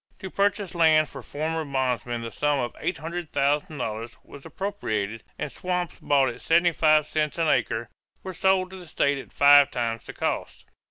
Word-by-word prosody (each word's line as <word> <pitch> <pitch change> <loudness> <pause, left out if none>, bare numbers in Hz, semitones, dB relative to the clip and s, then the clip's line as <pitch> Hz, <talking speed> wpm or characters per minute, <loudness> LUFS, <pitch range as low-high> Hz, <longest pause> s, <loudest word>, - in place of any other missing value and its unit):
To 190 - -8
purchase 200 -2 0
land 160 -3 +4
for 135 - -9
former 160 +5 -3
bondmen 125 -4 -2
the 115 - -5
sum 145 +3 +1
of 120 -2 -2
$800,000 145 -7 -2
was 140 - -13
appropriated; 115 - -3
and 145 - -4
swamps 180 -2 -3
bought 140 -3 +3
at 120 - -8
seventy 170 +1 +3
five 155 -2 +4
cents 150 0 -2
an 165 -1 +1
acre 115 -4 +1 0.4
were 190 - -6
sold 190 +1 +2
to 190 - -9
the 180 -2 -11
state 140 -2 +1
at - - -11
five 145 0 +7
times 115 -3 -2
the - - -9
cost. - - -3
150 Hz, 170 wpm, -25 LUFS, 125-170 Hz, 0.4 s, five